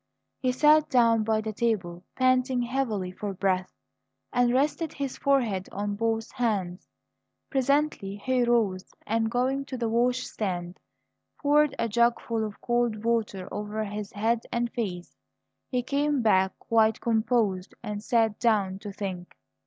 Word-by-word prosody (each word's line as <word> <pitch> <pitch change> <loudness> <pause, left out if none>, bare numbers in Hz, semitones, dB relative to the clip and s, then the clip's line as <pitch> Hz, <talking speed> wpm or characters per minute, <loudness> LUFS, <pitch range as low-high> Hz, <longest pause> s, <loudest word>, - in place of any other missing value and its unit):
He 255 -2 +1
sat 300 +4 +4
down 230 -3 +4
by 220 0 +1
the 220 0 -4
table, 190 -6 -1
panting 255 -1 +2
heavily 235 -7 -2
for 200 +1 -5
breath, 185 -1 0 0.6
and 245 -1 +3
rested 295 +5 0
his 275 -2 -4
forehead 235 -9 +1
on 205 +1 -3
both 225 +1 -1
hands. 200 -8 -2 0.6
Presently 275 -6 +1
he 250 +4 0
rose, 220 -6 0
and, 225 +1 0
going 260 +3 0
to 265 -2 -6
the 235 -1 -1
wash 245 +2 +1
stand, 180 -3 -4 0.6
poured 295 0 +3
a 230 - 0
jugful 235 0 +1
of 210 -2 -6
cold 240 -3 0
water 220 -5 -1
over 210 +1 -3
his 205 0 -5
head 225 +3 +1
and 235 0 -1
face. 180 -7 -4 0.5
He 250 -1 -1
came 285 0 0
back 190 -3 +3
quite 220 -1 +2
composed, 220 -5 0
and 210 -2 -4
sat 225 -3 +1
down 200 -5 +1
to 205 0 -7
think. 190 -3 -6
225 Hz, 145 wpm, -27 LUFS, 205-250 Hz, 0.6 s, sat